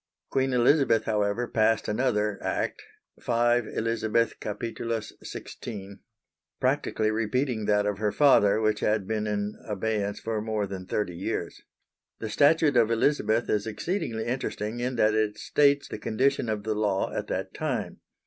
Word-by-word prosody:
Queen 135 0 +1
Elizabeth, 125 -1 +4
however, 105 +2 0
passed 110 -1 +2
another 105 -3 0
Act - - -2 0.4
(5 120 -1 +2
Elizabeth 115 0 0
Cap. 105 -1 -5 0.6
16) 100 -3 -8 0.6
practically 130 -5 +1
repeating 115 +1 -1
that 105 0 +2
of 105 -1 -1
her 105 -1 +1
father, 110 -8 +5
which 110 -1 +1
had 105 -2 +1
been 110 +1 -2
in 105 0 -2
abeyance 105 0 -2
for 110 -1 -2
more 110 -1 -1
than 95 -1 -7
thirty 95 -4 -2
years. 90 -1 -4 0.6
The 110 - -5
Statute 145 +3 +4
of 115 -2 +4
Elizabeth 115 -1 +2
is 105 +1 0
exceedingly 110 - -2
interesting 120 -2 -3
in 125 +1 -2
that 110 -2 +3
it 110 -1 0
states 140 -1 +2
the - - -6
condition 130 +1 +1
of 105 -1 -2
the 110 +1 -1
law 105 -2 0
at - - -3
that - - -3
time. - - -3
110 Hz, 150 wpm, -27 LUFS, 105-120 Hz, 0.6 s, father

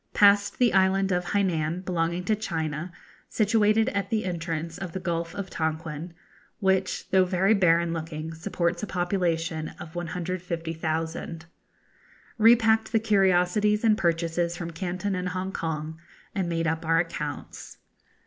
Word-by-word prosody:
Passed 205 0 +5
the 245 -2 +3
island 190 0 +3
of 180 0 0
Hainan, 175 -3 0
belonging 170 0 -1
to 215 +4 +1
China, 165 -5 -3 0.4
situated 215 0 +3
at 200 -1 -2
the 215 -3 0
entrance 165 -1 -3
of 185 -4 -6
the 190 - -3
Gulf 170 -2 -3
of 200 -2 -5
Tonquin, 160 +1 -3 0.4
which, 190 -2 +1
though 190 -1 +5
very 185 +3 +2
barren 170 -4 +3
looking, 160 -1 -5
supports 170 0 -2
a 210 - -3
population 175 -3 -1
of 155 0 -9
150,000. 165 -2 -3 0.9
Repacked 220 -1 +5
the 225 - +3
curiosities 205 0 +3
and 220 -2 +5
purchases 170 -2 0
from 170 -1 -5
Canton 185 +4 -3
and 180 0 -2
Hongkong, 165 -4 -4 0.3
and 190 -4 -1
made 165 -1 -1
up 160 0 -1
our 165 0 +2
accounts. 150 -3 -4
175 Hz, 135 wpm, -26 LUFS, 165-195 Hz, 0.9 s, Passed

